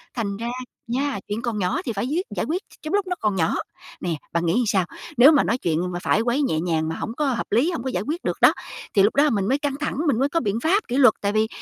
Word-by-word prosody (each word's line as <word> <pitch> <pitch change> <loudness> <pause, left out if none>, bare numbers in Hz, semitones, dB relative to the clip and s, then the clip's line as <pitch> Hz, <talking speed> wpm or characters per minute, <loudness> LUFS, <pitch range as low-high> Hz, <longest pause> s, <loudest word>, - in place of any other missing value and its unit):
Thành 200 -5 -2
ra 230 +2 -4 0.4
nha, 265 0 -1
chuyện 210 +2 -3
còn 235 -2 -2
nhỏ 180 -1 0
thì 235 - -2
phải 200 +2 -2
quyết 335 +7 -1
giải - - -1
quyết 350 +5 -2 0.2
trong 310 - -5
lúc 405 -1 +1
nó 360 - -1
còn 210 -2 0
nhỏ. 165 -3 +1 0.5
Nè, 175 -2 -1 0.2
bạn 170 0 0
nghĩ 165 - +2
làm 245 +4 +2
sao? 195 -4 +2 0.3
Nếu 260 +5 +9
mà 295 - +4
nói 230 - 0
chuyện 175 -3 -1
mà 175 - -3
phải - - +2
quấy 240 +5 +1
nhẹ 210 - +1
nhàng 160 -2 0
mà 160 - -3
hổng 225 - -4
có 300 - +1
hợp 255 -4 -1
lý, 250 - +3
hông 245 -9 -4
có 260 - -2
giải 180 -6 -2
quyết 325 +4 -3
được - - -1
đó - - +7 0.4
thì 195 - +5
lúc 205 - +2
đó 290 +2 +5
mình 200 -5 0
mới 265 +4 +2
căng 285 -2 -2
thẳng, 300 - -2
mình 240 -6 +2
mới 275 +2 +2
có 335 - +1
biện 210 -6 -1
pháp 385 +7 +2
kỷ 250 - -1
luật. 255 -6 +7
Tại 200 - 0
vì 215 +1 +2
235 Hz, 295 wpm, -23 LUFS, 200-285 Hz, 0.5 s, Nếu